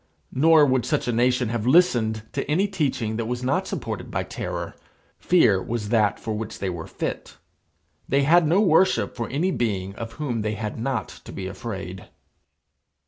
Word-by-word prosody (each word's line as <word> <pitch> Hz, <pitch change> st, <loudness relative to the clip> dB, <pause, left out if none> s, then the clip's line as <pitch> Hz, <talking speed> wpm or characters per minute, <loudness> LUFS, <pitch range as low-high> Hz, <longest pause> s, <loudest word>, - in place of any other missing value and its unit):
Nor 155 Hz, +2 st, +6 dB
would 130 Hz, -3 st, +2 dB
such -, -, -1 dB
a -, -, +2 dB
nation 125 Hz, 0 st, +2 dB
have 115 Hz, 0 st, -2 dB
listened 120 Hz, -9 st, +3 dB
to -, -, -1 dB
any 185 Hz, +7 st, +2 dB
teaching 130 Hz, -, -1 dB
that 115 Hz, -1 st, -2 dB
was 125 Hz, +1 st, -3 dB
not 130 Hz, +2 st, 0 dB
supported -, -, -5 dB
by -, -, -2 dB
terror. -, -, -5 dB, 0.4 s
Fear 115 Hz, -, +4 dB
was 110 Hz, 0 st, -4 dB
that 110 Hz, -3 st, +2 dB
for 110 Hz, -, -4 dB
which 110 Hz, 0 st, -5 dB
they 95 Hz, -2 st, -2 dB
were 85 Hz, -2 st, -6 dB
fit. -, -, -5 dB, 0.7 s
They 140 Hz, +1 st, +3 dB
had 165 Hz, +3 st, +5 dB
no 175 Hz, +6 st, +4 dB
worship 185 Hz, -1 st, +3 dB
for 115 Hz, -2 st, -4 dB
any 165 Hz, +8 st, 0 dB
being 100 Hz, -, -2 dB
of 115 Hz, -1 st, -6 dB
whom 130 Hz, -7 st, -3 dB
they 110 Hz, 0 st, -2 dB
had 105 Hz, +1 st, -5 dB
not 125 Hz, -1 st, -2 dB, 0.2 s
to -, -, -9 dB
be 95 Hz, -, -6 dB
afraid. 95 Hz, -2 st, -7 dB
120 Hz, 180 wpm, -24 LUFS, 110-145 Hz, 0.7 s, Nor